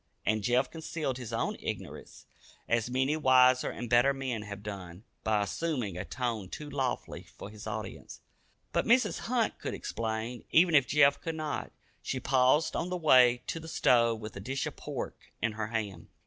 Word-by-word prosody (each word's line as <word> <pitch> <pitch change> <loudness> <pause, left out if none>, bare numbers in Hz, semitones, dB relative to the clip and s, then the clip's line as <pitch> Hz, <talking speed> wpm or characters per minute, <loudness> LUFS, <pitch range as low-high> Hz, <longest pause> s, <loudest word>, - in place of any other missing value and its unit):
And 110 0 +1
Jeff 125 +5 +1
concealed 155 -5 -3
his 120 -3 -7
own 115 - -1
ignorance, - - -7 0.4
as 115 0 +1
many 130 +4 +1
wiser 130 -3 +5
and 120 - -5
better 120 +4 +4
men 130 -5 -3
have 105 -1 -8
done, 95 -2 -7 0.2
by 105 -2 +2
assuming 125 - -2
a 90 - -3
tone 115 -7 -3
too 150 - -7
lofty 135 -3 -2 0.2
for 100 - -8
his 105 0 -10
audience. 110 -2 -6 0.5
But - - +1
Mrs. 245 +3 +3
Hunt 235 -1 0
could - - -4
explain, 115 +1 -4
even 170 +1 +5
if 140 -4 +5
Jeff 145 0 +4
could 165 -1 -3
not. 155 -2 -3 0.3
She 130 - -3
paused 130 +4 +3
on 175 - -1
the 180 - -2
way 125 -7 +5
to 165 - -3
the 160 - -10
stove 115 -7 +3
with 105 0 -7
a - - -6
dish 130 +7 -3
of - - -5
pork - - -7
in 115 - 0
her 105 0 -3
hand. 110 -3 -4
125 Hz, 180 wpm, -30 LUFS, 110-145 Hz, 0.5 s, wiser